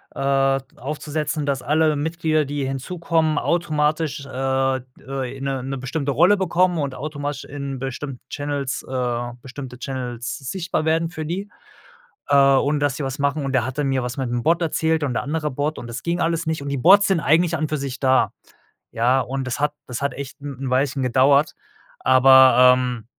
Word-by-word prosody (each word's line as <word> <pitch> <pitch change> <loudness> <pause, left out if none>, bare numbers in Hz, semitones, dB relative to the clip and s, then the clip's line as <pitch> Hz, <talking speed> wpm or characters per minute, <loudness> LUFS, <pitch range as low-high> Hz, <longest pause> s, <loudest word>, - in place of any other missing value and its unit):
äh, 135 0 +2
d 135 - -29
aufzusetzen, 150 +2 -3
dass 140 -2 -1
alle 155 0 +2
Mitglieder, 155 0 0
die 145 0 -3
hinzukommen, 160 +3 -1
automatisch, 155 -3 0
äh, - - -12
d 130 0 0 0.2
äh, 135 -1 -4
in 135 - -8
'ne 135 -2 -2
'ne 135 +1 -4
bestimmte 140 +2 -2
Rolle 175 +9 +5
bekommen 180 -1 +2
und 140 -4 -2
automatisch 145 0 -5
in 140 -1 -6
bestimmten 135 0 -5
Channels, 145 -2 -3
äh, 120 -2 -2
bestimmte 130 -1 -9
Channels 125 -3 -4
sichtbar 160 +4 -3
werden 165 +1 +1
für 160 -2 -6
die, 190 +6 -4 0.8
äh, 140 - +3 0.2
und 145 +2 +1
dass 145 -2 0
sie 150 - -4
was 135 0 -3
machen 140 0 0
und 135 - -3
da 130 -4 +2
hat 130 +3 -5
mir 135 -2 0
was 125 +1 -5
mit 130 -3 -2
'm 120 0 -2
Bot 170 +4 +2
erzählt 160 -1 0
und 135 -4 -1
der - - -1
andere 150 +1 -2
Bot 145 +3 -2
und 120 - -8
das 120 +1 -7
ging 170 +1 -1
alles 165 0 0
nicht 160 -2 -2
und 140 - -5
die 140 - -1
Bots 195 +9 +6
sind 190 -4 +1
eigentlich 165 +3 +3
an 160 - -4
und 155 - -1
für 155 - -1
sich 135 -2 -5
da, 130 -1 +2 0.6
ja? 125 +3 +2
Und 135 +2 -4
das 130 +2 -3
hat 150 0 +1
das 125 +1 -5
hat 140 - 0
echt 140 0 -8
'n 140 -3 -7
'n 135 - -3
Weilchen 135 +1 +1
gedauert, 135 +4 +3 0.5
aber, 130 -1 +7
ähm, 125 -3 -3
140 Hz, 200 wpm, -22 LUFS, 130-155 Hz, 0.8 s, aber